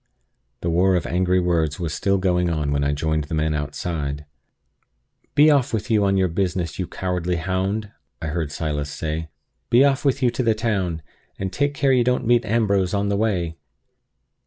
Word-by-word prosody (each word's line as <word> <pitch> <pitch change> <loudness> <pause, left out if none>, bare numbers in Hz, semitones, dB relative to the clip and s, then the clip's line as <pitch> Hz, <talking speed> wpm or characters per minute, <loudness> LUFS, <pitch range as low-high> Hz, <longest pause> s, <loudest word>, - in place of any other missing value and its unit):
The 85 - -1
war 90 +3 +3
of 85 - 0
angry 90 +1 +1
words 85 -4 0
was 85 -3 -3
still 100 0 +1
going 90 -2 +1
on 75 -3 -1
when 70 0 +1
I 70 - +1
joined 80 +1 -1
the 80 - -4
men 80 0 +1
outside. 75 0 -3 1.1
"Be 150 +2 +7
off 140 -5 +2
with 110 +3 -4
you 105 -2 +3
on 95 0 +2
your 95 -1 +3
business, 90 -1 -2
you 90 - -2
cowardly 90 -1 -2
hound!" 95 +5 -2 0.3
I 80 - -4
heard 80 -1 -2
Silas 75 -1 -3
say. 80 +2 -4 0.4
"Be 120 +3 +6
off 135 -2 +1
with 140 -1 +1
you 120 - +4
to 120 - -2
the 115 -3 +2
town! 95 -8 -1 0.3
and 95 -1 -4
take 145 0 0
care 135 -1 +2
you 125 -2 +4
don't 125 +1 +1
meet 120 +1 +3
Ambrose 100 -4 +1
on 100 0 0
the 100 - +1
way!" 90 -6 -1
90 Hz, 190 wpm, -22 LUFS, 80-110 Hz, 1.1 s, Be